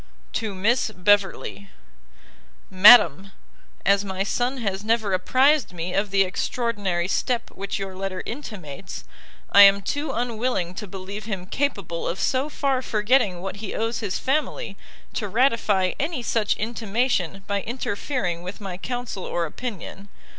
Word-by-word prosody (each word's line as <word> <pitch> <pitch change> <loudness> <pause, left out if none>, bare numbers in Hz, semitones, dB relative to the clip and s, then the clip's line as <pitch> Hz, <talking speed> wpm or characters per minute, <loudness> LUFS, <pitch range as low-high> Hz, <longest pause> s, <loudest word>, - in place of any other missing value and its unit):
To 215 -3 -2
Miss 225 +6 +1
Beverley. 200 0 +1 1.0
MADAM, 195 - +7 0.5
As 200 0 +4
my 190 -1 -2
son 245 +6 -1
has 200 -4 -3
never 220 -2 +1
apprized 260 +6 +3
me 175 +1 -4
of 200 +1 0
the 195 0 +4
extraordinary 195 -2 -1
step 240 +4 -1
which 200 +1 -4
your 195 -1 -5
letter 190 -1 -4
intimates, 195 - -7 0.5
I 200 - +8
am 200 0 +8
too 290 +7 -2
unwilling 235 -7 -1
to 210 +3 -7
believe 195 +2 -7
him 195 -5 -4
capable 200 - -2
of 180 - -3
so 265 +3 0
far 275 -3 0
forgetting 210 -5 +1
what 195 +2 -5
he 205 -1 -6
owes 225 +1 -1
his 200 -5 -2
family, 305 - -1 0.4
to 210 - -2
ratify 210 -4 +2
any 295 -4 -2
such 220 -1 +1
intimation 215 -4 -1
by 200 -1 -1
interfering 205 -5 -3
with 180 +3 -7
my 195 -4 -6
counsel 245 -5 -5
or 170 -1 -1
opinion. 200 +1 -7
205 Hz, 140 wpm, -24 LUFS, 190-240 Hz, 1.0 s, I